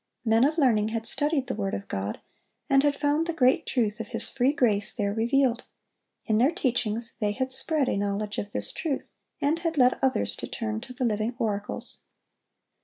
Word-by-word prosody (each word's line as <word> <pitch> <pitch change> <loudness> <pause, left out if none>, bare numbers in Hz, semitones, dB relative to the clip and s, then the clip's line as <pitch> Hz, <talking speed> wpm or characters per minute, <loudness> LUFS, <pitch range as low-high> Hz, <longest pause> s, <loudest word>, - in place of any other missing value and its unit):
Men 225 +1 +4
of 310 +3 0
learning 230 -8 +3
had 225 0 -3
studied 295 +1 0
the 255 - -3
word 200 -1 -2
of 200 - -7
God, 100 +2 -4 0.5
and 275 -3 +4
had 290 0 +2
found 295 +3 0
the 335 - -1
great 260 -5 +2
truth 225 -4 0
of 225 - -5
His 230 -1 -1
free 260 +2 +2
grace 215 -8 +2
there 200 -3 -2
revealed. 235 +2 +1 0.6
In 215 -2 +2
their 255 +4 +5
teachings 235 - -1
they 210 -2 0
had 260 +4 +5
spread 300 0 +1
a - - 0
knowledge 205 +1 -2
of 205 - -5
this - - -2
truth, 300 -5 -4 0.3
and 300 +4 +1
had 330 -2 -2
led 250 -1 +4
others 265 -1 +1
to - - -5
turn 220 -2 -4
to 255 +1 -9
the 255 0 -2
Living 220 +1 -1
Oracles. 210 -4 -2
240 Hz, 195 wpm, -26 LUFS, 215-275 Hz, 0.6 s, their